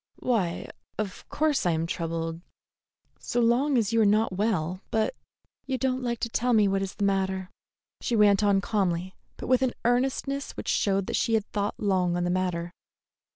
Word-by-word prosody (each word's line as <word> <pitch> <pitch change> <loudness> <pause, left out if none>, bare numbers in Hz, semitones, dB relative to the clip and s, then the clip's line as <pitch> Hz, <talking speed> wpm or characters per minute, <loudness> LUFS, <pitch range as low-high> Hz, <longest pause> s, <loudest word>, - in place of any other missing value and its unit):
"Why, 200 -9 -1 0.3
of 205 -3 -5
course 300 -2 +1
I 175 - +2
am 160 +1 0
troubled, 165 0 -3 0.8
so 245 - -2
long 250 +4 +3
as 225 -2 +1
you 230 - +4
are - - +6
not 210 0 +3
well, 185 -3 -1
but 220 - 0 0.3
" - - -48
"You 265 -1 -1
don't 260 0 0
like 235 -2 -2
to - - 0
tell 245 +2 +1
me 215 -2 +5
what 195 0 +1
is 195 -1 -4
the 205 - -3
matter," 190 -1 0 0.5
she 240 - 0
went 205 -2 +5
on 200 -2 +3
calmly, 190 -4 -1 0.2
but - - -6
with 255 0 +3
an 260 -2 +1
earnestness 270 +3 0
which - - -4
showed 195 -1 +1
she 225 - +2
had 215 -2 0
thought 205 0 -2
long 185 -4 +1
on 175 - 0
the 175 - 0
matter. 175 -2 -1
205 Hz, 190 wpm, -27 LUFS, 185-235 Hz, 0.8 s, are